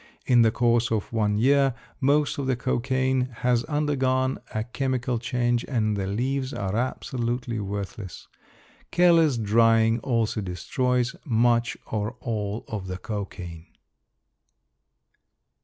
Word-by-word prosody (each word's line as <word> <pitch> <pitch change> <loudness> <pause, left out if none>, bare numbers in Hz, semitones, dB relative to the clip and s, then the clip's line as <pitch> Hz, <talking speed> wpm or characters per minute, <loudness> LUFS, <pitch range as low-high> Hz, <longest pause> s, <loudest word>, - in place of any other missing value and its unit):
In 120 -2 +5
the 115 - +5
course 120 +1 +2
of 110 0 -2
one 105 -2 +1
year 135 +2 +3 0.2
most 145 +2 +2
of 135 - -2
the 130 - +2
cocaine 130 +1 0 0.2
has 120 -1 +3
undergone 135 -3 0
a 110 - -2
chemical 125 -1 -2
change 120 0 0
and 110 -5 0
the 95 -1 -2
leaves 130 +6 -2
are 100 0 -2
absolutely 120 -1 -2
worthless. 100 -1 -6 0.6
Careless 165 -6 +4
drying 115 +1 +3
also 115 -3 0
destroys 125 - -1
much 120 -2 +2
or 110 +3 -3
all 105 -2 -3
of 100 -4 -5
the 90 0 -4
cocaine. 95 -6 -6
120 Hz, 120 wpm, -25 LUFS, 110-130 Hz, 0.6 s, In